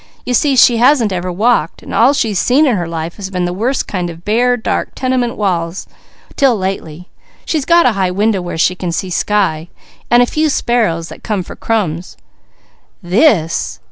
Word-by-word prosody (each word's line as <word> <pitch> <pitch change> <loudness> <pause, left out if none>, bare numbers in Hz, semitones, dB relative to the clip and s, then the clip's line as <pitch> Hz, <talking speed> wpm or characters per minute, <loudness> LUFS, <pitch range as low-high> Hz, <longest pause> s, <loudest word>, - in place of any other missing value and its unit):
"You 250 - -2
see 275 +3 +2
she 240 -1 +5
hasn't 240 -4 +3
ever 180 0 -3
walked, 205 -3 0
so - - -8
all 250 +5 +4
she's 215 -8 0
seen 275 +5 +3
in 255 -6 +2
her 175 -3 -3
life 165 0 -5
has 195 -2 -6
been 180 -2 -2
the 175 - -2
worst 240 +8 -1
kind 180 -3 -3
of 165 +1 -11
bare, 245 +4 +2
dark 225 - -3
tenement 255 -2 -1
walls, 175 -3 -2 0.5
'til 270 -4 +3
lately 180 -3 -5 0.4
she's 305 -5 -1
got 340 0 +4
a 250 - +4
high 195 -3 0
window 200 +1 0
where 175 -2 -5
she 175 - +2
can 180 -1 -4
see 180 +2 -3
sky, 175 -5 0 0.4
and 240 +1 +5
a - - +2
few 310 +5 0
sparrows 220 - 0
that - - -11
come 205 -4 -2
for - - -10
crumbs. 180 - -3 0.9
This!" 175 - +1
200 Hz, 190 wpm, -15 LUFS, 175-245 Hz, 0.9 s, she